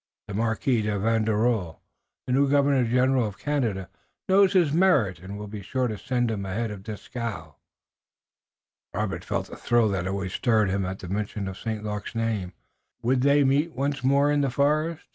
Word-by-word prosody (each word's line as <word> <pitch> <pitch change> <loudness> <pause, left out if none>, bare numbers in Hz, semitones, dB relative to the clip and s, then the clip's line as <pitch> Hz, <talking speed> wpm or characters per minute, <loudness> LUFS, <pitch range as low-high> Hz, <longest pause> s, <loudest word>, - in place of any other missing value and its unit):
The 105 - -6
Marquis 115 +3 +1
de 105 -1 -1
Vaudreuil, 110 -3 +1 0.5
the 125 - -1
new 140 +1 +3
Governor 140 -2 +3
General 125 0 +2
of 100 - -8
Canada, 115 -11 -1 0.4
knows 195 0 +5
his 170 -6 +3
merit 150 - +3
and 95 +3 -8
will 105 - -6
be 105 0 -7
sure 130 +5 -1
to 110 - -3
send 120 +1 -1
him 100 -3 -3
ahead 105 +4 -2
of 100 -2 -7
Dieskau." 105 -5 -6 1.4
Robert 105 -1 -2
felt - - -2
the - - -10
thrill 120 -2 +2
that 95 -2 -1
always 95 -1 -3
stirred 110 -6 +2
him 95 -1 -1
at 95 +1 -4
the 95 - -9
mention 100 +1 -3
of 95 0 -6
St. 110 -2 -4
Luc's 105 +1 -5
name. 110 -5 -2 0.5
Would 125 +2 +2
they 140 +1 +4
meet 145 +5 +2
once 140 +1 -2
more 140 +2 +3
in 145 0 +2
the 140 - +1
forest? 150 +5 0
115 Hz, 180 wpm, -26 LUFS, 100-135 Hz, 1.4 s, knows